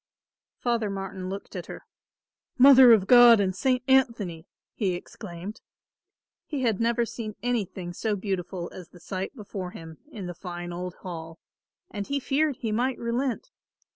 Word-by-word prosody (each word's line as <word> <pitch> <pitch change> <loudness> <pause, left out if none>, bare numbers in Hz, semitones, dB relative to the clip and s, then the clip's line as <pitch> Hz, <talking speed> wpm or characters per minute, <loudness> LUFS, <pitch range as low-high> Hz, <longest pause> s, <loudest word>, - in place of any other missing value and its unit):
Father 235 -3 0
Martin 195 -1 -5
looked 195 +1 -7
at - - -5
her. - - -9 0.7
"Mother 260 -1 +9
of 215 -4 +5
God 240 -1 +8
and 190 -2 0
St. 255 +4 +1
Anthony!" 230 -11 +1 0.3
he 195 -5 0
exclaimed. 175 +3 -8 0.9
He 285 -4 -3
had 225 -3 +1
never 235 +1 +2
seen 220 -2 -6
anything 200 -7 -2
so 215 +3 -1
beautiful 185 -3 -4
as 180 -3 -10
the 175 - -16
sight 190 +8 -5
before 200 -5 -6
him 160 -2 -11
in 205 -8 -7
the 175 - -5
fine 175 0 -7
old 180 +1 -5
hall 165 -2 -7 0.5
and 205 -2 -5
he 280 0 -1
feared 285 +2 +1
he 225 -2 -4
might 245 +4 0
relent. 245 - -2
205 Hz, 155 wpm, -26 LUFS, 180-240 Hz, 0.9 s, Mother